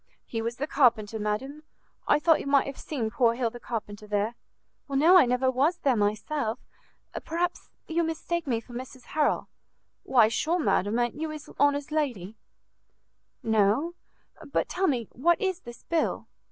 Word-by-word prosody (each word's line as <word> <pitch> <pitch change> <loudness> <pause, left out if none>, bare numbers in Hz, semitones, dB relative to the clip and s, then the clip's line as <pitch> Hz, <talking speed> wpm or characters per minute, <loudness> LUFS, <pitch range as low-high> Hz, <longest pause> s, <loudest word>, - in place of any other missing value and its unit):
"He 225 - -4
was 230 +1 -3
the 275 - -2
carpenter, 230 -7 +2
madam. 255 +8 -3 0.5
I - - +5
thought 320 +1 +4
you - - -6
might 280 -1 +4
have 275 - -7
seen 235 -8 -3
poor 235 -2 +3
Hill 235 -2 -1
the 240 - -9
carpenter 210 -3 -6
there." 210 +2 0 0.6
"No, 300 +7 +5
I 345 -9 +7
never 250 +1 +2
was 290 +7 +2
there 270 -6 +2
myself. 220 +4 -1 0.7
Perhaps 345 +2 -2 0.2
you 335 +1 0
mistake 330 0 -2
me 235 -4 +1
for 240 - -14
Mrs 255 +1 -8
Harrel." 300 -1 +1 0.5
"Why, 235 -4 +4
sure, 315 +9 0
madam, 220 - +1
a'n't 240 +5 -1
you 320 - -2
his 305 -1 -8
honour's 285 0 +2
lady?" 240 - -2 1.1
"No. 220 +9 +2 0.5
But 280 - -1
tell 380 +1 0
me, 240 -7 0
what 340 +7 +2
is 375 -2 -1
this 240 -7 -12
bill?" 335 -1 -1
260 Hz, 165 wpm, -27 LUFS, 225-310 Hz, 1.1 s, I